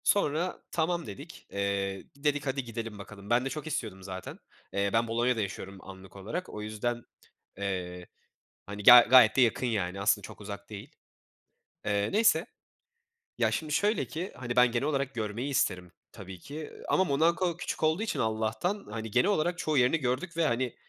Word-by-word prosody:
Sonra 175 -2 +1
tamam, 170 0 0
dedik. 150 +4 -10
Eee, 100 -1 -2
dedik 145 0 -1
"Hadi, 135 0 -1
gidelim 115 -3 -6
bakalım." 100 0 -11
Ben 120 +2 +3
de - - -1
çok 150 +2 -6
istiyordum 105 -10 -4
zaten. 95 -1 -7 0.3
Eee, 100 0 +1
ben 115 +1 +2
Bolonya'da 120 +1 +1
yaşıyorum 95 -1 -5
anlık 95 0 -12
olarak, 105 - -5
o 105 - -7
yüzden, 110 +3 -3 0.6
eee, 90 -3 -4 0.6
hani, 100 +1 -7
ga 120 +3 +11
gayet 125 -4 +8
de 135 - +4
yakın 125 +1 +2
yani. 100 -4 -2
Aslında 100 - +2
çok - - -12
uzak 100 0 -8
değil. 105 +6 -9 0.9
Eee, 100 -1 +1
neyse. 210 -4 +4 0.9
Ya, - - +2
şimdi, 155 -2 -2
şöyle 205 +7 +2
ki, 175 +5 -5
hani, 120 -1 -5
ben 125 -1 +5
genel 120 +3 0
olarak 140 -2 -1
görmeyi 115 +4 -3
isterim 90 -9 0 0.2
tabii 95 -2 -10
ki, 140 +10 -10
eee, 155 -1 -8
ama 190 - +4
Monako 170 +3 +1
küçük 175 - -4
olduğu 160 +5 +2
için 225 - -2
Allah'tan, 110 - -1
hani, 110 0 -5
genel 125 - +3
olarak 175 -2 +1
çoğu 155 -4 0
yerini 130 +5 +4
gördük 135 +5 -2
ve, 165 - +3
hani, 120 +1 -1
120 Hz, 175 wpm, -29 LUFS, 100-155 Hz, 0.9 s, ga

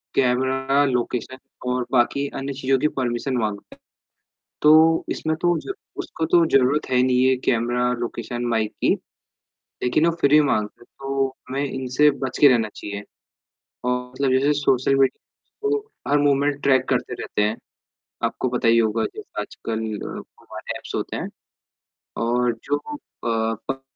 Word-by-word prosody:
Camera 135 +2 +2
location 125 0 -2 0.3
और 125 0 0
बाकी 135 +3 +2
अन्य 135 +1 -3
चीज़ों 135 0 +1
की 150 - +3
परमिशन 125 +1 -1
माँगता 105 -3 -4 0.9
तो 150 +1 +7 0.4
इसमें 160 0 -1
तो 175 -1 +3
ज 390 - -5 0.3
उसको 160 - -4
तो 170 -1 +6
ज़रूरत 135 +3 +3
है 125 - +3
नहीं 130 0 +2
ये 130 0 +4
कैमरा 120 +1 +1
लोकेशन 120 0 -4
माइक 110 -2 0
की। - - +4 0.9
लेकिन 155 +7 +2
वो 170 - +3
फिर 140 - +4
भी 150 +1 +7
माँगता 110 -8 0
है, - - -15
तो 135 +1 -2 0.2
हमें 135 +2 -1
इनसे 130 +2 +2
बच 135 -2 -4
के 145 - +8
रहना 115 -4 +3
चाहिए। 100 0 -6 0.8
और 125 0 +1
मतलब 130 +1 -1
जैसे 140 +3 +3
सोशल 135 -1 +2
मीडिया, 135 -1 +2 0.4
तो 420 0 +1 0.3
हर 145 - +3
मूवमेंट 145 0 +2
ट्रैक 135 -2 +3
करते - - 0
रहते - - -3
हैं। 105 +2 +1 0.7
आपको 130 - -1
पता 120 -2 0
ही 115 - +5
होगा 110 0 +1
जैसे - - -6
आजकल 110 -1 -5 0.2
अ, - - -6
वो - - -13
वाले - - -5
ऐप्स - - -10
होते - - -3
हैं, - - -4 0.9
और 120 +1 +1
जो 145 - +1
अ, 295 - -7 0.7
प 135 - -4
130 Hz, 160 wpm, -23 LUFS, 120-140 Hz, 0.9 s, के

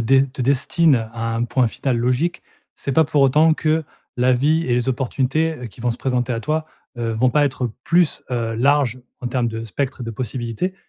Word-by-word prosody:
de 135 +4 +4
te 135 -1 -2
destine 135 -2 +2
à 115 0 -3
un 115 +1 0
point 125 0 +1
final 125 +2 -1
logique, 125 +9 0 0.3
c'est 140 - -4
pas 160 +4 +5
pour 145 -2 +2
autant 155 +4 +5
que 160 0 0 0.3
la 125 +1 +3
vie 155 +6 +2
et 120 - +1
les 125 +1 0
opportunités, 135 +5 0
heu, 125 - -7
qui 115 - -14
vont 120 0 0
se 115 - -3
présenter 125 -1 -1
à 115 - -2
toi, 155 +4 -1 0.3
heu, 115 -1 -1
vont 125 +3 +2
pas 145 +3 +3
être 130 -3 -1
plus, 170 -4 +2
heu, 115 -2 -1
larges 130 0 +2 0.2
en 125 - -4
termes 120 -1 0
de 115 0 -5
spectre 130 +3 -3
de 115 - -4
possibilités 120 - -3
130 Hz, 210 wpm, -21 LUFS, 120-145 Hz, 0.3 s, pas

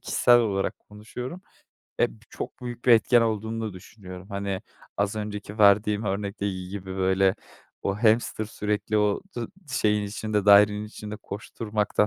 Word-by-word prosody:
kişisel 120 0 +4
olarak 100 -4 -1
konuşuyorum. 125 - -8 0.6
Eee, 120 - +3
b - - -17
çok - - -7
büyük 120 -1 -7
bir 125 - +4
etken 120 +2 +5
olduğunu 110 0 -1
da - - -8
düşünüyorum. 95 -1 -11
Hani, 100 -1 -3 0.3
az 100 +1 0
önceki 105 0 -5
verdiğim 105 +1 +4
örnekteki 100 -2 -3
gibi 95 -1 -6
böyle, 95 0 +3 0.5
o 100 - 0
hamster 110 -1 +3
sürekli 105 0 -1
o 105 -1 +2 0.2
dı 120 -1 -3 0.2
şeyin 105 -4 +2
içinde, 105 0 -2
dairenin 105 +1 +6
içinde 105 0 -8
koşturmaktan, 105 0 -2
105 Hz, 145 wpm, -26 LUFS, 100-110 Hz, 0.6 s, dairenin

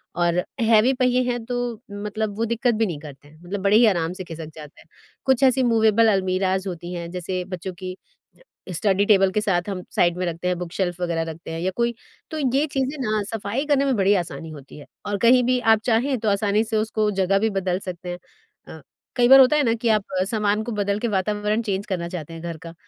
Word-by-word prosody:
और 175 0 +1 0.2
हैवी 225 +3 +4
पहिए 250 -1 +2
हैं 240 -1 -4
तो 245 -2 -3
मतलब 210 0 -4
वो 230 - 0
दिक्कत 235 +1 +1
भी 225 +1 +1
नहीं 165 -7 -4
करते 145 -1 -12
हैं, 155 - -19
मतलब 190 +3 -5
बड़े 200 +2 +5
ही 235 - +6
आराम 175 -4 +1
से 185 - -7
खिसक 160 -2 -8
जाते 150 -2 -12
हैं। - - -20 0.4
कुछ 265 0 +3
ऐसी 260 0 +4
मूवेबल 225 -1 +4
अलमीराज़ 190 0 0
होती 175 0 -7
हैं 170 -1 -5
जैसे 180 +1 -3
बच्चों 185 0 -6
की 185 -1 -5 0.8
ज 180 - -4
स्टडी 200 +3 +2
टेबल 195 -2 +4
के 210 - 0
साथ 190 -2 0
हम 190 -2 -4
साइड 175 0 +2
में 185 - -1
रखते 170 +1 -3
हैं 180 0 0
बुक 175 -1 -6
शेल्फ़ 180 -2 -2
वगैरह 170 -2 -1
रखते 165 +1 -10
हैं 165 - -4
या 185 +2 0
कोई 235 0 0 0.4
तो 315 - -4 0.2
ये 285 +2 +3
चीज़ें 270 +2 -1
ना 215 -3 0
सफ़ाई 225 +6 -3
करने 280 -2 +2
में 270 -3 +1
बड़ी 195 0 +3
आसानी 165 -1 -8
होती 140 -2 -12
है। - - -12 0.2
और 205 0 -1
कहीं 245 +3 +5
भी 250 +1 +2
आप 220 - +2
चाहें 250 +3 +1
तो 215 -1 0
आसानी 205 +1 +1
से 220 -1 -2
उसको 215 0 0
जगह 195 +1 +2
भी 220 +2 +1
बदल 190 -2 -1
सकते 180 -2 -7
हैं। 175 - -4 0.5
अ, - - -10 0.3
कई 245 -1 +4
बार 270 +2 +9
होता 265 +3 +6
है 300 - +3
ना 230 -3 +2
कि 230 0 -1
आप 215 -2 +3 0.3
सामान 210 -1 +1
को 235 - -5
बदल 205 -1 -1
के 235 - -1
अ, - - -2
वातावरण 210 +3 0
चेंज 200 -3 -2
करना 175 -3 -3
चाहते 165 -2 -7
हैं 165 - -8
घर 170 -1 -5
का। 165 +1 -10
205 Hz, 240 wpm, -23 LUFS, 180-230 Hz, 0.8 s, बार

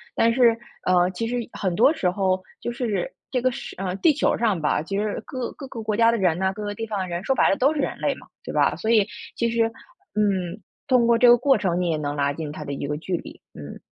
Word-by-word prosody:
但 230 0 +3
是， 235 -2 +4 0.3
呃， 180 -1 +4
其 225 +5 -3
实 245 - -2 0.2
很 185 -3 -2
多 255 - +5
时 185 - 0
候 185 0 0 0.2
就 240 - -3
是 240 - -2 0.2
这 250 - -1
个 255 +1 +2
是 - - -7
呃， 185 -1 -2
地 315 +8 +4
球 - - +1
上 215 -6 +1
吧， 150 0 +1
其 195 +5 -4
实 210 0 -2
各 255 -4 -4
各 275 - -9
个 235 -3 -7
国 215 -1 -1
家 230 0 +5
的 230 - 0
人 180 -5 +2
呢， 190 0 +1
各 210 +1 -7
个 205 0 -3
地 225 +2 -5
方 210 -2 -3
的 185 - -2
人 175 +1 -4
说 265 - +1
白 - - +4
了 - - +3
都 275 +4 +3
是 305 - -3
人 - - -2
类 - - 0
嘛， - - -15 0.2
对 - - -6
吧？ - - +2
所 220 - -3
以 220 -3 +5 0.3
其 235 - 0
实， 230 -1 +2 0.5
嗯， 200 -2 0 0.3
通 250 -3 +4
过 235 0 +4
这 245 - +5
个 240 0 +8
过 270 +2 +3
程， 180 -3 0
你 175 - 0
也 160 - +1
能 145 -1 -3
拉 140 -1 +1
近 150 0 -5
它 150 - -7
的 140 - -6
一 140 0 -4
个 150 +1 -2
距 175 +3 -2
离， - - -11
嗯。 75 -1 -9
210 Hz, 295 characters per minute, -24 LUFS, 180-235 Hz, 0.5 s, 个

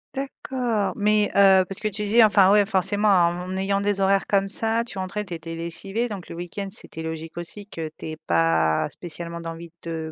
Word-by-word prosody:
D'accord, 255 -5 -2
mais, 210 0 +3
heu, 190 -2 +6
parce 195 - -7
que 215 - 0
tu 210 +1 -1
disais, 220 +3 +5
enfin, 200 -3 +6
ouais, 205 -1 +5
forcément, 205 +1 +1
en 180 0 +2
ayant 195 +1 0
des 205 -1 0
horaires 195 0 +3
comme 195 -1 +2
ça, 225 +3 0
tu 195 - -8
rentrais, 195 +3 -3
tu 180 - -7
étais 165 0 -6
lessivé, 195 +8 -3
donc 200 -5 -7
le - - -7
week-end, 175 +3 -5
c'était 160 -6 -8
logique 160 0 -6
aussi 195 +4 -7
que 160 -6 -5
tu - - -9
aies 155 - -7
pas 80 - +2
spécialement 170 0 -6
d'envie 165 0 -7 0.2
de 160 -1 -4
195 Hz, 200 wpm, -24 LUFS, 170-210 Hz, 0.2 s, heu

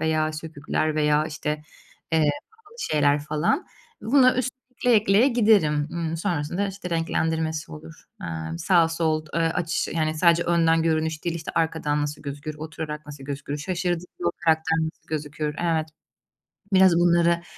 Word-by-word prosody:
veya 155 0 +1
sökükler 155 0 -2
veya, 150 0 +2
işte, 150 -1 -3 0.5
eee, 155 -2 +4 0.2
pahalı 440 0 -21
şeyler 145 - +2
falan. 155 - 0 0.4
Buna 255 +2 +5
üst 255 0 0 0.3
ekleye 245 -3 +4
ekleye 210 +5 +4
giderim. 200 - +3
Imm, 165 -1 -2
sonrasında, 175 +2 -1
işte, 190 -2 -7
renklendirmesi 160 - -1
olur. 80 +1 -10 0.3
Aaa, 80 -1 -5
sağ, 170 - +4
sol, 160 -1 -1
eee, 165 - +1
açış 165 +1 0
yani 155 -1 0
sadece 170 +1 +4
önden 165 -1 +3
görünüş 160 -1 0
değil, 170 -1 -1
işte, 160 - -6
arkadan 160 -3 0
nasıl 150 0 -4
gözükür, 145 +2 -6
oturarak 155 -1 -6
nasıl 145 -2 -10
gözükür, 140 +1 -5
şaşırdığında 175 +1 -3
o - - -2
karakter 160 0 +2
nasıl 160 0 -4
gözükür, 150 0 -3
evet. 160 -2 0 0.8
Biraz 190 -2 +6
bunları 170 0 +3
160 Hz, 145 wpm, -24 LUFS, 150-170 Hz, 0.8 s, Biraz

